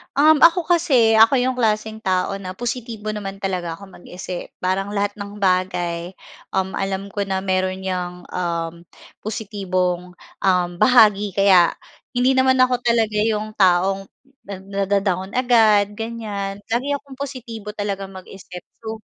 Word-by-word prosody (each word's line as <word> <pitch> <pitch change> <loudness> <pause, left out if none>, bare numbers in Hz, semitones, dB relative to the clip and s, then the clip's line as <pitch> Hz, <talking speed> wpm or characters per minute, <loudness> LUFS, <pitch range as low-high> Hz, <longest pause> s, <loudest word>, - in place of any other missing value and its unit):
Um, 310 +2 +6
ako 340 +2 +5
kasi, 260 -10 +4
ako 230 +4 +6
'yung 255 0 0
klaseng 220 -2 0
tao 190 -1 -1
na 185 -2 -7
positibo 230 -1 -5
naman 200 -2 -5
talaga 180 -3 -2
ako 190 +3 -13
mag-isip. 180 0 -8
Parang 195 +2 -1
lahat 205 0 -1
ng 200 0 -8
bagay, 180 -2 0 0.4
um, 190 0 -1
alam 195 0 -3
ko 200 0 -3
na 190 -1 -2
meron 185 0 -1
'yang, 180 -1 -4
um, 170 -1 -3 0.4
positibong, 185 -4 -2 0.2
um, 180 -2 +2
bahagi. 210 -3 +5
Kaya 190 -3 +5 0.4
hindi 255 +1 +2
naman 260 0 +4
ako 255 -1 +3
talaga 225 -3 +2
'yong 215 0 -1
taong 190 +1 +3 0.4
nad 195 -1 -7
nada-down 195 -1 -1
agad, 215 -5 +3
ganiyan. 210 -3 -5
Lagi 250 +5 0
akong 280 -2 -7
positibo 235 -6 -7
talagang 200 -2 -4
mag-isip. 185 -1 -10 0.2
So 220 0 -5
200 Hz, 140 wpm, -21 LUFS, 185-225 Hz, 0.4 s, Um